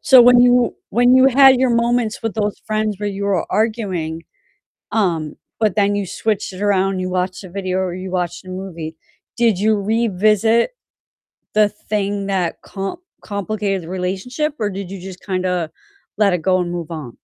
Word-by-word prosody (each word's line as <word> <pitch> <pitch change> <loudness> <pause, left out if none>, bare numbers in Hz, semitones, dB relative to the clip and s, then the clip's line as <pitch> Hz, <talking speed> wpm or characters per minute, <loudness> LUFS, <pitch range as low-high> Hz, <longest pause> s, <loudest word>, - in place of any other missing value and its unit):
So 260 -2 +7
when 245 0 +7
you 245 0 +4
when 245 +1 +4
you 260 0 +6
had 270 -1 +6
your 260 -2 +3
moments 235 -1 +1
with 225 -2 -2
those 210 -2 -1
friends 215 -2 -1
where 205 0 -2
you 200 0 -4
were 195 -4 0
arguing, 190 -8 -1 0.7
um, 170 -8 0 0.2
but 215 -4 +1
then 205 -1 +3
you 200 -2 -2
switched 210 +1 -2
it 185 +2 -7
around 195 -1 +2
and 185 - -3
you 185 0 -3
watched 185 +1 -2
a - - -8
video 185 0 -2
or 185 -2 -1
you 185 +1 -6
watched 180 -1 -3
a - - -12
movie, 170 -4 -6 0.4
did 230 -5 +2
you 215 +1 +2
revisit 215 - +2 0.8
the 210 -1 +4
thing 205 -1 -3
that 185 -4 -1
com 195 - -5 0.2
complicated 200 -2 -2
the 165 - -10
relationship 195 +11 -2
or 210 - 0
did 195 -2 -6
you 195 - -6
just 185 0 -9
kinda 180 -4 -1 0.5
let 200 -3 +3
it 180 - -1
go 185 +2 +2
and 175 -1 -2
move 170 -1 -5
on? 150 -8 -7
200 Hz, 185 wpm, -19 LUFS, 185-220 Hz, 0.8 s, So